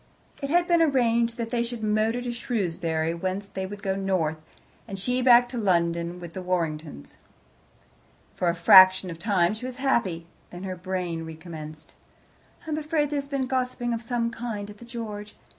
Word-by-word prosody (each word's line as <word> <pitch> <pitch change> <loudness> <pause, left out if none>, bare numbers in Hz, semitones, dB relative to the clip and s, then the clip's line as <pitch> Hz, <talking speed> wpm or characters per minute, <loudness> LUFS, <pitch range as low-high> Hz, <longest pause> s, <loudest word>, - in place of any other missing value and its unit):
It 275 - -3
had 350 +3 +3
been 340 -1 +4
arranged 235 -5 +2
that 230 -1 -4
they 240 - +1
should 235 -1 -4
motor 215 +3 +1
to 245 - -2
Shrewsbury, 170 -9 -1
whence 190 +3 -4
he 190 0 -3
would 205 +1 -9
go 190 -1 0
north, 185 -5 0 0.5
and 195 - -6
she 250 +6 0
back 245 -1 +7
to 245 -1 -4
London 170 -3 +1
with 170 -1 -9
the 185 - -5
Warringtons. 160 - -3 1.2
For 175 - 0
a 170 - 0
fraction 185 +1 +7
of 165 - -9
time 190 -2 +2
she 235 +4 -6
was 255 - -5
happy. 205 -11 0 0.2
Then 175 +1 -9
her 185 -1 -4
brain 180 -2 -3
recommenced. 160 -1 -9 0.7
"I 315 - -5
am 305 - 0
afraid 300 -1 0
there 295 - 0
has 280 - -10
been 275 -2 -1
gossiping 250 -2 -1
of 230 - -3
some 235 -1 -1
kind 220 -3 -5
at 205 - -15
the 235 - -11
George. 215 -3 -7
205 Hz, 185 wpm, -26 LUFS, 175-240 Hz, 1.2 s, back